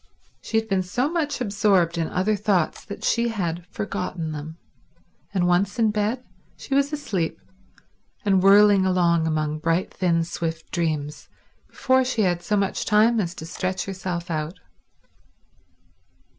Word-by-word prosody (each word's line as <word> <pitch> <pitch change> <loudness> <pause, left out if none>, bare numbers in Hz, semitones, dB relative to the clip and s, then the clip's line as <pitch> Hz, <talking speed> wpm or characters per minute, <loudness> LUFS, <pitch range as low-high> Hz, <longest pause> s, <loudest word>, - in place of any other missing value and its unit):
She 225 - -2
had 220 0 0
been 195 -3 +1
so 245 - -1
much 320 -4 -1
absorbed 200 -6 +2
in 165 -1 -1
other 195 +4 +1
thoughts 195 -5 0
that 200 - -8
she 235 0 +2
had 175 -6 -3
forgotten 165 - -4
them; 155 +2 -7 0.7
and, 185 -3 +1
once 185 +6 +1
in 225 -2 +3
bed, 215 +4 -1 0.3
she - - -6
was 280 +1 +2
asleep 205 - -2 0.9
and 195 -2 +3
whirling 200 0 +6
along 170 -3 +2
among 155 -1 -1
bright, 165 +3 0
thin 170 -3 +1
swift 165 -1 -5
dreams 155 -4 -2 0.4
before 260 0 +2
she 250 -4 0
had 175 -2 +1
so 210 +3 0
much 195 -1 0
time 220 +2 +4
as 180 -3 -2
to 160 - -8
stretch 185 +2 -3
herself 180 -3 -4
out. 155 +3 -3
185 Hz, 145 wpm, -24 LUFS, 170-210 Hz, 0.9 s, whirling